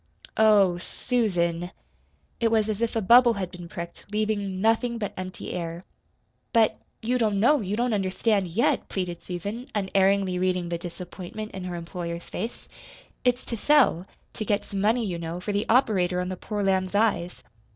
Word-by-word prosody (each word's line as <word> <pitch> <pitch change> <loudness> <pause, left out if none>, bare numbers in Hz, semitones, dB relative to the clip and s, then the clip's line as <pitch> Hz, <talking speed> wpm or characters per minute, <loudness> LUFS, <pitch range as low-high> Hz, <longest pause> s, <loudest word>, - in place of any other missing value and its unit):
"Oh, 205 -5 +5
SUSAN!" 175 -6 -1 0.7
It 230 - +3
was 220 -1 +2
as 215 0 -2
if 235 0 0
a 225 - 0
bubble 240 +4 +7
had 190 -4 -4
been 175 -2 -9
pricked, 170 0 -8
leaving 210 -3 -1
nothing 225 +3 +2
but 205 -4 -3
empty 185 0 -6
air. 170 0 -5 0.7
"But 225 -2 +3 0.2
you 250 +3 +1
don't 210 -4 +1
know 270 +6 +4
you 200 0 -2
don't 240 +1 +1
understand, 195 0 +1
yet," 180 +8 +1
pleaded 180 -3 -3
Susan, 205 - -5
unerringly 195 -1 +2
reading 180 -1 0
the 170 -1 -2
disappointment 180 +4 -7
in 190 -1 -6
her 180 -1 -4
employer's 170 0 -5
face. 230 - -6 0.6
"It's 250 0 +1
to 235 - -3
sell 230 - +3 0.3
to - - -4
get 205 0 0
some 195 -2 -4
money, 225 +3 +2
you 175 -4 -3
know, 165 +1 -4
for 195 +3 -3
the 205 +1 -1
operator 190 -8 +3
on 180 0 -2
the 185 - -3
poor 205 +2 -3
lamb's 190 0 +1
eyes. 200 -5 +1
195 Hz, 170 wpm, -26 LUFS, 180-220 Hz, 0.7 s, bubble